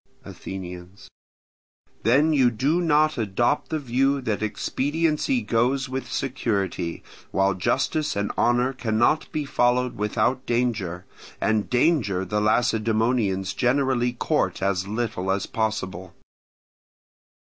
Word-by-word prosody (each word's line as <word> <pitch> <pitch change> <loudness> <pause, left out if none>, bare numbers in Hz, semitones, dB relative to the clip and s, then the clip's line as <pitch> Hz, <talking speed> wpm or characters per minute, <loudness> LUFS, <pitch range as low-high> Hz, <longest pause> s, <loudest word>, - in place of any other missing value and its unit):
Athenians. 90 0 -9 0.9
Then 140 +8 +3
you 130 -4 +4
do 140 +10 0
not 155 -3 +2
adopt 115 +6 0
the 160 - -1
view 135 0 +1
that 110 -5 -2
expediency 155 - 0
goes 130 +3 +1
with 130 0 -5
security, 100 -10 -2 0.3
while 95 0 +2
justice 150 - 0
and 100 0 -1
honour 125 +2 +2
cannot 120 +4 +1
be 150 -1 -2
followed 125 -1 +1
without 110 +5 0
danger; 110 -8 -1 0.3
and 110 -1 0
danger 120 - +2
the 105 +3 -1
Lacedaemonians 110 -3 +1
generally 125 -1 +1
court 120 - 0
as 95 -1 0
little 105 -3 -2
as 95 0 0
possible. 95 -4 -3
120 Hz, 110 wpm, -24 LUFS, 100-135 Hz, 0.9 s, you